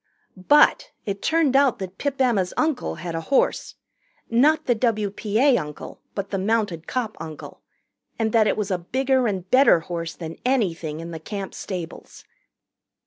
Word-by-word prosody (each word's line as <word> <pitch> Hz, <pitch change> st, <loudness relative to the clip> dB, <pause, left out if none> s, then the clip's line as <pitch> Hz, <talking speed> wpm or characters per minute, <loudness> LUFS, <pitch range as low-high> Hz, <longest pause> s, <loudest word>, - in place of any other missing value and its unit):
But 250 Hz, +11 st, +4 dB, 0.2 s
it 200 Hz, -1 st, -4 dB
turned 320 Hz, -5 st, +2 dB
out 275 Hz, -3 st, +4 dB
that 190 Hz, -2 st, -8 dB
Pip 280 Hz, -1 st, -2 dB
Emma's 220 Hz, -9 st, +1 dB
uncle 310 Hz, -4 st, 0 dB
had 165 Hz, +2 st, -6 dB
a 165 Hz, -, -3 dB
horse 270 Hz, +11 st, 0 dB, 0.6 s
not 290 Hz, +7 st, +3 dB
the 245 Hz, -, +3 dB
W.P.A. 220 Hz, +2 st, +1 dB
uncle 150 Hz, -1 st, -8 dB
but 200 Hz, -1 st, -4 dB
the 195 Hz, -, -1 dB
mounted 200 Hz, -5 st, -1 dB
cop 240 Hz, -4 st, -2 dB
uncle 155 Hz, -2 st, -9 dB, 0.6 s
and 220 Hz, -1 st, 0 dB
that 220 Hz, -1 st, +4 dB
it -, -, +1 dB
was 210 Hz, -2 st, -2 dB
a 185 Hz, -, 0 dB
bigger 260 Hz, +6 st, +1 dB
and 190 Hz, -3 st, -3 dB
better 255 Hz, -10 st, +6 dB
horse 165 Hz, -2 st, -5 dB
than 165 Hz, 0 st, -7 dB
anything 170 Hz, -, -1 dB
in 170 Hz, +1 st, -7 dB
the 165 Hz, -, -6 dB
Camp 195 Hz, +3 st, -6 dB
stables. 180 Hz, -4 st, -7 dB
210 Hz, 160 wpm, -23 LUFS, 175-255 Hz, 0.6 s, better